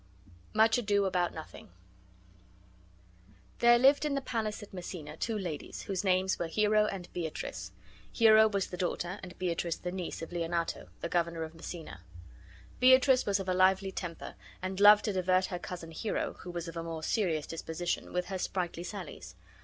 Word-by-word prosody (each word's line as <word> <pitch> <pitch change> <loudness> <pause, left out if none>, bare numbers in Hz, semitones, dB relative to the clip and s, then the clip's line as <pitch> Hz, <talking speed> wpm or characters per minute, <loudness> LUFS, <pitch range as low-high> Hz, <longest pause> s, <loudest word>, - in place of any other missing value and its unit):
MUCH 220 +2 +4
ADO 205 -3 +2
ABOUT 180 -2 +1
NOTHING 160 -9 -10 1.9
There 240 0 +7
lived 270 +4 +5
in 295 -2 0
the - - +1
palace 220 -4 -3
at 205 - -13
Messina 175 -4 -7
two 220 +6 -2
ladies, 170 -7 -5
whose 195 0 -2
names 190 0 +2
were 170 - -1
Hero 210 +4 +3
and 185 -4 -5
Beatrice. 150 - -5 0.4
Hero 220 -1 +6
was 200 -3 0
the 180 - -5
daughter, 180 +1 -2
and 180 -2 -10
Beatrice 170 -2 -1
the 180 - -5
niece, 180 -3 -5
of 165 - -7
Leonato, 170 -1 -2
the - - -2
governor 170 -1 0
of 160 0 -7
Messina. 165 - -8 0.8
Beatrice 260 0 +6
was 200 0 +2
of 190 - -5
a 185 - +1
lively 190 +1 +3
temper 175 -3 -6 0.3
and 185 +1 -4
loved 205 +1 +8
to 210 - 0
divert 185 0 +2
her 180 -1 -4
cousin 175 -2 -7
Hero, 205 +6 -2
who 180 - -9
was 175 -1 -5
of 165 - -7
a 165 - -3
more 165 -1 -5
serious 165 -9 0
disposition, 165 +1 -4
with 180 0 -1
her 190 0 -4
sprightly 175 -2 -2
sallies. 180 -2 -8
185 Hz, 175 wpm, -31 LUFS, 170-205 Hz, 1.9 s, loved